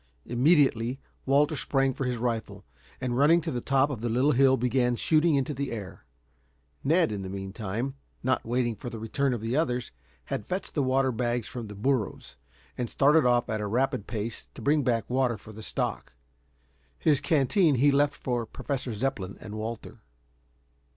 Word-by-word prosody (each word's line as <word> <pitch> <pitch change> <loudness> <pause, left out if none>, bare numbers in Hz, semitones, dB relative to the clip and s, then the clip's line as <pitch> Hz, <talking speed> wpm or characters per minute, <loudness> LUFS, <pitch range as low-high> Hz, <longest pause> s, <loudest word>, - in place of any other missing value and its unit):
Immediately 130 -2 +3 0.3
Walter 145 +3 +3
sprang 135 -2 +1
for 135 - -3
his 125 -1 -1
rifle, 115 -1 -3 0.3
and 125 -1 -2
running 150 +6 +5
to - - -3
the 120 - -2
top 135 +2 +2
of 120 -6 -5
the 120 - -1
little 130 +6 +3
hill 135 0 +4
began 125 0 +1
shooting 155 +5 +3
into 140 +2 0
the 140 0 -3
air. 105 -5 -7 0.8
Ned, 165 -1 +3
in 100 -2 -3
the 95 - -6
meantime, 100 +6 -4 0.3
not 130 +1 +1
waiting 120 0 0
for 120 - -7
the 115 - -7
return 130 +5 -1
of 120 -3 -2
the 115 +3 -2
others, 125 -6 0 0.3
had 105 - -4
fetched 185 +2 -3
the 145 - +1
water 130 0 +2
bags 120 0 -1
from 120 -3 -6
the 105 - -9
burros, 115 +1 -1 0.4
and 120 -2 -1
started 145 0 +4
off 120 0 +3
at 110 -2 -2
a 105 - -2
rapid 130 0 0
pace 110 0 -5
to - - -9
bring 150 +1 +3
back 115 -5 0
water 125 -2 +1
for 110 +2 -13
the 110 - -9
stock. 105 - -3 0.8
His 150 -4 +2
canteen 155 +2 +3
he 140 +4 +4
left 145 +1 +2
for 120 -3 -2
Professor 130 0 -4
Zepplin 105 -5 -3
and 105 - -9
Walter. 110 +1 -6
125 Hz, 180 wpm, -28 LUFS, 115-140 Hz, 0.8 s, running